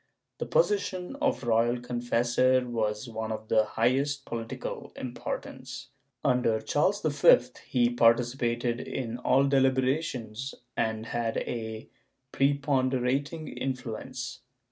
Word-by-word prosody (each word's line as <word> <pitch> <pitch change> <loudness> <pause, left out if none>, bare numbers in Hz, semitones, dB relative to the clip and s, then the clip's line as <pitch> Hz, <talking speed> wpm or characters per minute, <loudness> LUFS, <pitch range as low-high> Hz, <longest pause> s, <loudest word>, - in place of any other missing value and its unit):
^ - - -54
The - - -3
position 275 - +1
of 280 - 0
royal 120 +1 +2
confessor 125 +1 +1
was 110 -1 -1
one 110 -1 -4
of 110 0 -5
the 110 -1 +4
highest 135 +6 +1
political 115 -1 -5
importance. 125 -1 -6 0.4
Under 125 -3 +3
Charles 150 - +1
V 145 -3 +6 0.3
he 120 -2 +2
participated 120 0 +2
in 120 -2 -4
all 130 +2 +3
deliberations 130 -2 +1 0.2
and 110 -1 -1
had 115 -1 -2
a 110 -2 -4 0.5
prepon 140 -1 +2
derating 140 +5 -1
influence. 125 -1 -4
125 Hz, 110 wpm, -28 LUFS, 115-135 Hz, 0.5 s, V